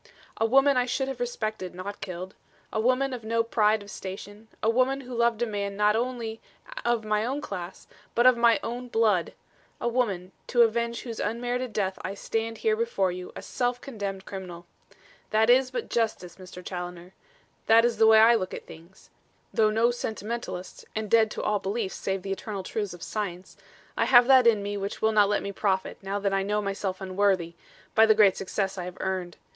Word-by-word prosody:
A 225 - +2
woman 270 +3 +4
I 250 0 +2
should 265 +2 -1
have 265 -2 -5
respected, 215 -6 -3
not 200 +3 -7
killed. 185 0 -6 0.4
A 220 - 0
woman 255 +4 +2
of 245 -3 -6
no 230 +1 +1
pride 220 -2 +2
of 205 - -11
station; 205 +3 -8 0.2
a - - +2
woman 255 +4 +2
who 255 -1 -9
loved 235 -1 +1
a - - +2
man 200 -2 -3
not 210 0 +3
only 230 -2 -3 0.4
of 235 -2 0
my 215 0 +1
own 265 +5 -2
class 185 -9 -7 0.3
but 240 - +3
of 255 -1 +8
my 235 -1 +4
own 245 +2 -4
blood 220 -7 +1 0.5
a - - -1
woman, 205 -7 -1 0.2
to 240 -1 +5
avenge 235 +1 0
whose 230 -3 -6
unmerited 245 +3 -2
death 195 -3 -2
I 195 +2 -4
stand 225 +2 -3
here 440 -1 +1
before 440 - 0
you 180 0 -7
a - - -7
self 245 0 -1
condemned 200 -7 -5
criminal. 180 -3 -8 0.6
That 220 +2 +4
is 255 +1 +4
but 255 - -4
justice, 215 -7 -2
Mr. 180 -1 -11
Challoner. 180 0 -6 0.5
That 230 +1 +6
is 240 -1 0
the 220 - +5
way 220 0 +8
I 225 +2 +7
look 185 -5 -1
at - - -9
things. 170 +4 -15 0.4
Though 215 -1 +4
no 225 +3 +3
sentimentalist; 225 -4 -5
and 215 -1 -3
dead 225 -1 +5
to - - -5
all 210 -1 +1
beliefs 195 0 -2
save 190 -1 -3
the 195 - -4
eternal 195 0 -4
truths 200 -1 -3
of 175 - -11
science, 190 -4 -5 0.4
I - - +2
have 245 -1 +7
that 260 -2 +6
in 215 -3 +4
me 205 0 -3
which 200 0 -4
will 220 - +4
not 210 -2 +4
let 205 - 0
me 200 - -4
profit, 190 -1 -1
now 195 +1 -3
that 200 -1 -1
I 195 - +2
know 205 +2 0
myself 195 -2 -3
unworthy, 185 -3 +1 0.4
by 220 0 +6
the 220 - +5
great 205 -3 +5
success 195 0 -3
I 175 - -4
have 180 0 -8
earned. 185 -2 -3
215 Hz, 205 wpm, -27 LUFS, 195-235 Hz, 0.6 s, of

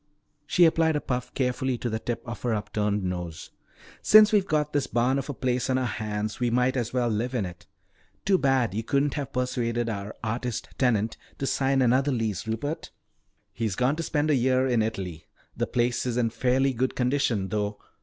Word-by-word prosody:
She 175 - +5
applied 160 -1 +3
a - - +2
puff 125 -3 -3
carefully 130 0 0
to 120 - -3
the 110 -1 -2
tip 120 +1 -4
of 120 - -6
her 120 -3 0
upturned 105 -1 -1
nose. 90 -3 -5 0.5
"Since 215 0 +7
we've 200 -3 +3
got 150 -1 0
this 145 -2 +1
barn 125 +3 +1
of 135 - -6
a - - -2
place 125 0 -1
on 130 - +2
our 130 - 0
hands, 110 -2 -3
we 120 -1 +1
might 125 +2 +2
as 120 -3 -1
well 125 -1 +1
live 120 +3 -1
in 110 -6 0
it. 90 +1 -10 0.6
Too 195 -1 +3
bad 130 -7 +2
you 110 - -1
couldn't 140 +4 +1
have 140 -3 -4
persuaded 120 -2 -1
our 100 -1 -5
artist 115 +1 -3
tenant 115 -4 +1 0.2
to 135 - -2
sign 135 0 +2
another 130 +4 +3
lease, 110 -5 -2
Rupert." 145 +9 -3 0.6
"He's 110 -5 -2
gone 125 +6 +2
to 165 - -3
spend 155 -1 0
a - - +4
year 130 +1 +2
in 120 -3 +2
Italy. 95 -7 -4 0.3
The - - -1
place 120 +1 0
is 120 -1 -1
in 115 -2 +1
fairly 130 +3 +1
good 130 +2 -1
condition 125 -6 0
though. 105 0 -2
125 Hz, 200 wpm, -26 LUFS, 110-135 Hz, 0.6 s, Since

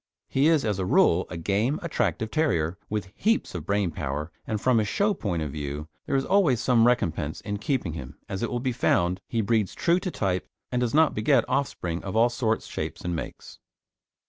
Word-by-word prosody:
He 135 +3 +3
is, 160 -5 +3
as 105 -3 0
a 95 - 0
rule, 90 -1 +4
a 85 - -5
game, 105 - 0
attractive 110 -9 -1
terrier, 90 - +1
with 105 -2 -3
heaps 225 +2 +1
of 85 -2 -6
brain 100 -3 +1
power, 75 +2 -4 0.2
and 110 - -1
from 125 +1 +3
a - - +2
show 205 - +1
point 90 - -2
of 75 - -4
view 75 +1 -5 0.2
there 140 - 0
is 135 - +1
always 180 - +3
some 120 -2 +4
recompense 80 -10 0
in 105 -1 -3
keeping 105 - -1
him, 65 -4 -8
as 95 - -4
it 120 - -1
will 120 - -2
be 130 +1 -1
found 90 -6 +1
he 115 - 0
breeds 110 -2 +1
true 170 +1 +2
to 185 - -3
type 95 - -2 0.2
and 125 - 0
does 125 +1 0
not 160 0 +5
beget 120 +3 +3
offspring 90 -11 -2
of 95 +1 -5
all 115 +2 +5
sorts, 115 -2 -1
shapes, 80 +1 -5
and 90 -1 -2
makes. 80 - -7
105 Hz, 210 wpm, -26 LUFS, 85-130 Hz, 0.2 s, not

